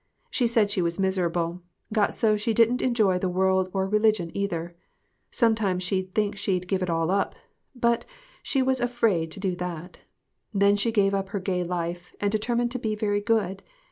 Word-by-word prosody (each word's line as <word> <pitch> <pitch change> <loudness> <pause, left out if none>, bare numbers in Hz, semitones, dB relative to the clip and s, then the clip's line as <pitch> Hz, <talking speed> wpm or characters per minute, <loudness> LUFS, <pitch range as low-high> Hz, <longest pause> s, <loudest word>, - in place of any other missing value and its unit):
She 245 - +2
said 225 -3 +2
she 195 - +1
was 170 +1 -1
miserable; 175 -2 0 0.3
got 210 -1 +2
so 215 -2 +3
she 215 +2 -1
didn't 235 +2 +4
enjoy 215 -7 +2
the 185 - -1
world 190 0 +2
or 190 0 0
religion, 210 -4 +2
either. 175 -4 -3 0.5
Sometimes 220 -6 +1
she'd 185 0 -2
think 210 -1 +1
she'd 185 -2 -1
give 190 0 0
it 180 - -1
all 165 +1 +1
up, 200 0 0 0.4
but 235 -1 +1 0.4
she 270 -2 +1
was 260 0 +1
afraid 230 -9 +1
to 195 - -6
do 190 -2 -1
that. 180 0 -6 0.6
Then 200 +1 +4
she 205 +3 +1
gave 200 -3 +2
up 195 0 -1
her 200 - -2
gay 180 -1 -1
life, 175 0 -4
and 205 0 0
determined 235 +3 0
to 255 - -3
be 220 -2 -1
very 205 -1 0
good. 205 -4 0
195 Hz, 185 wpm, -26 LUFS, 180-220 Hz, 0.6 s, didn't